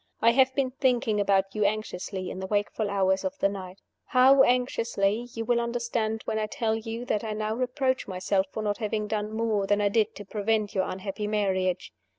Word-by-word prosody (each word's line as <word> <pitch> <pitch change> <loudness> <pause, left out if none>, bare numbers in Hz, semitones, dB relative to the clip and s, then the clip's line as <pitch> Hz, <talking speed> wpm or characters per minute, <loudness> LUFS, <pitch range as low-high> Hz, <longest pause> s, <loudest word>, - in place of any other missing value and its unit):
I 230 - +5
have 260 +1 +3
been 270 -2 +1
thinking 245 -5 +1
about 195 -1 +2
you 215 - 0
anxiously 200 -2 -2
in - - -6
the 190 - -4
wakeful 205 +1 -1
hours 190 -1 +1
of 285 0 -3
the - - +3
night. 190 -1 -7 0.2
How 265 +2 +6
anxiously, 235 -3 +1
you 225 0 -3
will 235 +1 +2
understand 235 -2 -2
when 220 - -1
I 215 - -1
tell 220 +1 -1
you 225 +2 -5
that 210 -3 -1
I 220 -1 -3
now 215 0 -2
reproach 255 +2 -1
myself 190 +1 0
for 220 - -4
not 205 +1 -1
having 215 -1 -1
done 210 0 -2
more 220 -3 0
than 205 +1 +2
I 205 -1 +2
did 220 +1 +1
to 205 - -9
prevent 210 +1 -1
your 190 -1 +1
unhappy 195 +2 -4
marriage. 190 -3 0
215 Hz, 200 wpm, -27 LUFS, 200-235 Hz, 0.2 s, How